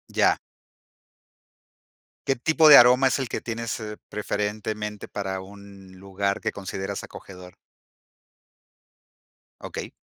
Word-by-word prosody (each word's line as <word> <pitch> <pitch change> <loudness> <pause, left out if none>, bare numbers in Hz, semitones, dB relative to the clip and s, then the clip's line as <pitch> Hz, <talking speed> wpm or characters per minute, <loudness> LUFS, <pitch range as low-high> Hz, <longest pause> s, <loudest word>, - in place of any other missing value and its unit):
Ya. - - +3 1.9
¿Qué 135 - +2
tipo 155 +4 +4
de 145 - +11
aroma 125 +2 +6
es 130 - +1
el 135 -2 -3
que - - -4
tienes, 115 0 -4
eh, 105 -1 -7
preferentemente 105 0 -4
para 95 -2 -4
un 100 -1 -14
lugar 100 +1 -2
que - - -2
consideras 95 -1 -5
acogedor? 90 -1 -12 2.1
Okey. - - -6
105 Hz, 110 wpm, -24 LUFS, 95-115 Hz, 2.1 s, de